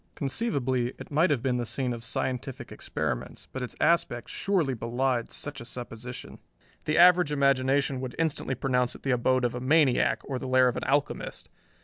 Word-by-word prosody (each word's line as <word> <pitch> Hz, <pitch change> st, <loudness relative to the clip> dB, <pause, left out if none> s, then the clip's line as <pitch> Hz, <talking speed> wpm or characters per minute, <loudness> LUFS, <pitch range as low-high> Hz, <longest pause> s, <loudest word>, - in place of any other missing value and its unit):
Conceivably 135 Hz, -, -1 dB
it -, -, -10 dB
might 155 Hz, +5 st, +3 dB
have 135 Hz, -5 st, 0 dB
been 125 Hz, -2 st, +1 dB
the 120 Hz, -, -1 dB
scene 125 Hz, +1 st, -2 dB
of 115 Hz, -1 st, -7 dB
scientific 125 Hz, +2 st, -3 dB
experiments, -, -, -4 dB
but 130 Hz, -, -4 dB
its 125 Hz, -, -4 dB
aspect 155 Hz, -8 st, +1 dB
surely 175 Hz, -9 st, 0 dB
belied 120 Hz, +1 st, -1 dB
such 145 Hz, -2 st, -5 dB
a -, -, -6 dB
supposition. 120 Hz, 0 st, -7 dB, 0.5 s
The 155 Hz, -, +1 dB
average 180 Hz, -2 st, +6 dB
imagination 140 Hz, -1 st, +2 dB
would 130 Hz, -2 st, -5 dB
instantly 155 Hz, -4 st, -1 dB
pronounce 125 Hz, -1 st, 0 dB
it -, -, -13 dB
the 135 Hz, -, 0 dB
abode 125 Hz, +1 st, +2 dB
of 120 Hz, -, 0 dB
a 125 Hz, -, -5 dB
maniac, 140 Hz, -1 st, +3 dB
or 130 Hz, -2 st, -4 dB
the 130 Hz, -, -5 dB
lair 130 Hz, 0 st, +5 dB
of 125 Hz, -, 0 dB
an -, -, -3 dB
alchemist. 140 Hz, +2 st, -1 dB
130 Hz, 180 wpm, -28 LUFS, 125-145 Hz, 0.5 s, average